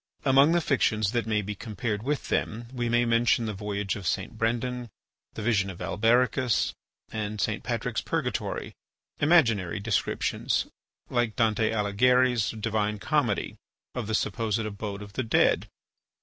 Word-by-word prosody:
Among 140 +4 +6
the 175 - +3
fictions 110 - +1
that 120 -2 -1
may 105 -1 +1
be 105 +2 -4
compared 105 +1 -4
with 140 +4 -2
them 115 +2 -1
we 120 -2 -1
may 120 +1 +3
mention 115 0 +3
"The 110 - -2
Voyage 100 -1 -3
of 95 -4 -5
St. - - -2
Brendan," 120 +2 -1 0.5
"The - - -5
Vision 100 -4 +2
of 95 - -7
Albericus," 120 +2 +2 0.4
and 105 -1 -3
"St. - - 0
Patrick's - - -2
Purgatory," - - -2 0.5
imaginary 115 - +3
descriptions, 105 +1 0 0.5
like 120 -3 +1
Dante 110 -1 +2
Alighieri's 120 +3 +3
"Divine 105 -1 -1
Comedy," 130 -3 0 0.4
of - - -4
the 110 - 0
supposed 110 0 0
abode 105 -1 -5
of 100 -1 -12
the 130 - -1
dead. 115 - +2
110 Hz, 145 wpm, -27 LUFS, 105-120 Hz, 0.5 s, Among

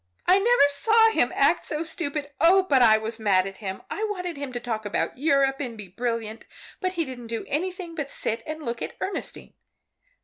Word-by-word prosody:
"I 375 - +5
never 455 -7 +5
saw 445 +10 +4
him - - +2
act - - +3
so 305 +1 -3
stupid! 300 -3 -4
Oh, 365 +4 +6
but 275 -8 +3
I 220 -2 +7
was 220 +1 -4
mad 195 -4 +3
at 195 0 -7
him! 190 -3 -6
I 430 - -4
wanted 360 -4 -4
him 280 -2 -5
to 240 - -3
talk 230 -3 -4
about 205 - -2
Europe 275 -2 +2
and 245 -5 -5
be 205 -3 -9
brilliant, 230 +1 -3 0.4
but 370 -2 -1
he 335 -3 -1
didn't 245 -3 -8
do 230 0 -4
anything 355 +3 -3
but 295 -4 -4
sit 225 -3 -3
and 310 0 -5
look 235 -3 -4
at - - -4
Ernestine. 390 - -4
280 Hz, 205 wpm, -25 LUFS, 230-340 Hz, 0.4 s, I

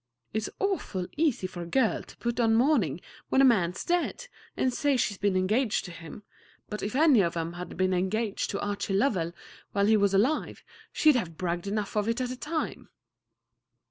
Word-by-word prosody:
"It's 220 0 -1
awful 375 - -1
easy 300 - +1
for 185 -1 -6
a 170 - -6
girl 245 +3 +1
to - - -15
put 235 0 -2
on 225 -2 +4
mourning 225 - +2 0.3
when - - +3
a 270 - +7
man's 180 -8 +2
dead, 355 +8 -1 0.3
and 255 - +1
say 285 0 +1
she's 205 -5 -1
been 200 -1 +1
engaged 215 +5 +1
to 180 - -7
him; 170 +4 -10 0.5
but 210 - -4
if 205 +4 -3
any 295 -4 +5
one 190 - +4
of 170 - -5
'em 165 +1 -3
had 180 +1 -7
been 185 0 +2
engaged 200 +4 -1
to 200 - -3
Archie 205 -1 -2
Lovell 195 -7 +1 0.4
while 200 -1 +2
he 215 +1 +5
was 200 -1 +2
alive, 255 +11 +1 0.3
she'd 305 -3 +4
have 175 -10 -2
bragged 175 0 -2
enough 210 +1 -2
of 210 +1 +1
it 230 - 0
at 250 -1 -1
the 255 - -4
time." 310 +4 -4
210 Hz, 200 wpm, -28 LUFS, 185-255 Hz, 0.5 s, a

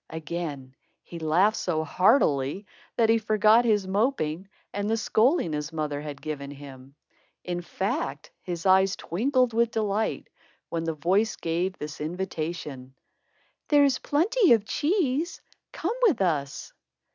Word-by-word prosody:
Again, 155 -4 -5 0.3
he 170 - -9
laughed 175 +7 +2
so 160 -3 -1
heartily, 170 - +2 0.3
that 225 -1 +3
he 225 0 +4
forgot 215 +2 +4
his 210 -4 +2
moping 190 - -1 0.2
and 205 +1 -2
the 225 - +1
scolding 225 - +2
his 150 +1 -3
mother 150 -2 -3
had 145 -2 -8
given 140 -2 -5
him. 135 -1 -12 0.5
In 175 -1 -3
fact, 170 -6 -3
his 175 -1 -5
eyes 190 0 +4
twinkled 250 - 0
with 235 0 +2
delight, 215 -1 -1 0.4
when 165 -1 -3
the 165 -1 -2
voice 190 +8 +1
gave 175 +3 -2
this 150 0 -7
invitation: 155 -6 -5 0.7
"There's 285 -3 +4
plenty 370 - +3
of 220 -3 +2
cheese. 315 - 0 0.3
Come 365 +7 -2
with 435 - +4
us." 150 -7 -2
185 Hz, 135 wpm, -26 LUFS, 155-225 Hz, 0.7 s, he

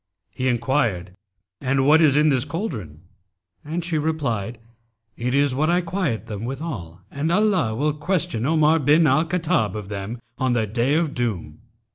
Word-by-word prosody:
He 130 +5 -2
enquired, 115 -7 0 0.5
'And 135 0 +1
what 155 +3 +6
is 145 -3 +5
in 150 +1 +4
this 130 -4 +2
cauldron?'; 130 - -5 0.6
and 165 +4 -3
she 165 -3 0
replied, 125 -8 -2 0.6
'It 125 +2 -2
is 140 -1 +3
what 155 +5 +1
I 175 +1 +3
quiet 165 - -2
them 105 -2 -6
withal, 120 - -6
and 150 +4 -2
Allah 185 - +2
will 150 +5 0
question 155 - -1
Omar 155 +2 +3
bin 150 +3 +4
al 150 +3 +3
Khattab 170 -5 0
of 105 -2 -6
them, 105 +3 -5 0.2
on 130 -1 +1
the 115 -2 +1
Day 120 +7 0
of 160 -2 0
Doom.' 115 -8 -3
140 Hz, 165 wpm, -23 LUFS, 115-160 Hz, 0.6 s, what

